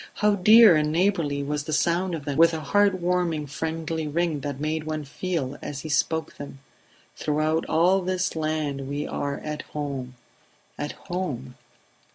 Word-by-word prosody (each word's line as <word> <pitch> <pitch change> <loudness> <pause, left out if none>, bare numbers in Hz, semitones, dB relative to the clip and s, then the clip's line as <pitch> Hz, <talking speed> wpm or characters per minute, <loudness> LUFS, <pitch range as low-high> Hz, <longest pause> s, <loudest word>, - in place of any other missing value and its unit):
How 210 0 +3
dear 215 0 +7
and 150 0 +1
neighbourly 165 -5 +1
was 145 +1 -3
the 155 - -3
sound 175 +3 +1
of 150 -3 -7
them, 145 -2 -2
with 165 +1 +5
a - - -3
heart 200 +5 +2
warming 175 -3 0
friendly 160 +2 -3
ring 160 0 0
that 140 -1 -5
made 155 +1 -2
one 155 -1 -3
feel 145 -2 -3
as 140 -1 -5
he 155 - -7
spoke 160 +2 0
them: 145 -1 -8 0.6
"Throughout 155 +2 0
all 180 +4 +3
this 185 0 -1
land 155 -3 -2
we 145 +1 -2
are 140 0 -3
at 150 0 -4 0.2
home... 135 -4 -4 0.6
at 145 0 -4
home 145 -9 -5
155 Hz, 165 wpm, -25 LUFS, 145-175 Hz, 0.6 s, dear